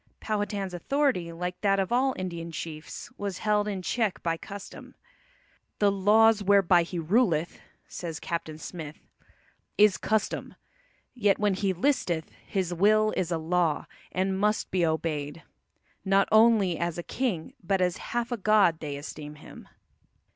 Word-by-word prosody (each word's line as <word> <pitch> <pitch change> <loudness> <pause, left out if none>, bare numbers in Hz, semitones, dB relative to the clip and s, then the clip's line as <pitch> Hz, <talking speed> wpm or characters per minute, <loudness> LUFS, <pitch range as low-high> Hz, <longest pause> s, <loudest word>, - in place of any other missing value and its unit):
Powhatan's 205 -3 -2
authority, 185 - 0
like 180 +2 -5
that 195 -1 +2
of 190 +2 -1
all 260 +2 +2
Indian 170 -2 -5
chiefs, 155 -1 -7
was 200 -2 -3
held 210 -1 +1
in 195 -3 -3
check 220 0 -1
by 165 -1 0
custom. 200 +4 -10 0.8
"The 205 -1 +3
lawes 210 +2 +4
whereby 195 -3 +5
he 175 +1 -5
ruleth," 170 -1 +1 0.3
says 165 -2 -6
Captain 165 -2 -4
Smith, 155 -1 -8 0.8
"is 210 -2 +5
custome. 215 -1 -1 0.6
Yet 210 -6 +2
when 210 -1 +1
he 195 0 0
listeth, 180 - 0 0.2
his 185 -3 -1
will 215 +4 +3
is 180 -3 -1
a 165 - +1
law, 165 -1 0 0.3
and 190 +1 -1
must 210 +1 0
be 185 -2 +1
obeyed: 160 -1 -2 0.6
not 195 0 +3
only 215 -5 +5
as 170 -1 -2
a 175 - -4
king, 220 -10 -3
but 195 +2 +1
as 180 0 +1
halfe 240 0 -3
a 240 - -1
god 200 -5 +3
they 145 -2 -5
esteeme 150 +1 -8
him." - - -13
190 Hz, 145 wpm, -27 LUFS, 170-210 Hz, 0.8 s, whereby